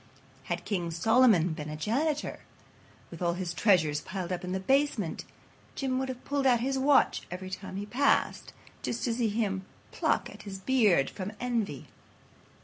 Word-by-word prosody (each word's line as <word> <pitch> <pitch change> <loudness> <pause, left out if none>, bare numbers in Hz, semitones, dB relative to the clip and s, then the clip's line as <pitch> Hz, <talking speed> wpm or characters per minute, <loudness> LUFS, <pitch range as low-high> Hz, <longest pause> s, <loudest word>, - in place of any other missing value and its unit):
Had 175 0 -3
King 175 -5 -1
Solomon 215 0 +4
been 155 -2 -5
the 150 - -4
janitor, 285 - -1 0.7
with 170 - -10
all 170 -1 +1
his 180 -1 -3
treasures 160 -7 +3
piled 185 0 -5
up 180 - -3
in 180 - -4
the 190 - -1
basement, 265 - +1 0.5
Jim 260 -1 -1
would 265 0 -2
have 255 -1 -7
pulled 280 -1 +1
out 245 -2 +5
his 265 +3 0
watch 270 +1 +3
every 185 +1 -6
time 190 0 -6
he 200 +1 -3
passed, 270 +6 +1 0.3
just 235 - -3
to 235 - +1
see 230 -1 +1
him 205 -3 -1 0.3
pluck - - 0
at - - -11
his 195 -2 -7
beard 200 - +3
from 195 +2 -5
envy. 235 -4 -2
205 Hz, 170 wpm, -29 LUFS, 180-255 Hz, 0.7 s, out